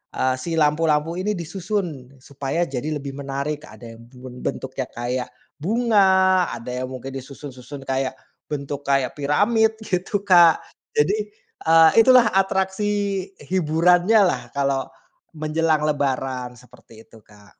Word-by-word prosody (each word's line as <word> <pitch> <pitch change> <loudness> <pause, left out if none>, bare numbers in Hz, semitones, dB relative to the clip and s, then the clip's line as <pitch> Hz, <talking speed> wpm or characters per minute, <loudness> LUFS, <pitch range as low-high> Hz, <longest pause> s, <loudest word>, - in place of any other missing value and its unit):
eee, 130 0 +1
si 165 +5 -4
lampu-lampu 155 +1 +2
ini 210 +3 -1
disusun, 170 - -5
supaya 140 +4 -3
jadi 145 +3 -3
lebih 140 0 -7
menarik, 140 +2 -4
ada 115 -1 -12
yang 115 - -15
ben 125 -1 -11
bentuknya 130 0 -3
kayak 125 +1 -3 0.3
bunga, 190 -2 +3
ada 115 +1 -7
yang 130 - -5
mungkin 130 +1 -7
disusun-susun, 135 0 -9
kayak, 130 0 -1 0.4
bentuk 145 -1 -4
kayak 135 -2 +1
piramid, 220 +10 +2
gitu 190 +1 -1
Kak. 175 -4 +6 0.4
Jadi, 205 +7 +1 0.4
eee, 160 0 +7
itulah 250 -1 +6
atraksi 190 +1 +1 0.5
hiburannyalah, 175 - +2
kalau, 135 -1 0 0.4
menjelang 155 0 0
Lebaran, 135 -3 -2
seperti 120 -3 -17
itu 115 - -16
Kak. 105 -1 -19
150 Hz, 125 wpm, -22 LUFS, 135-185 Hz, 0.5 s, eee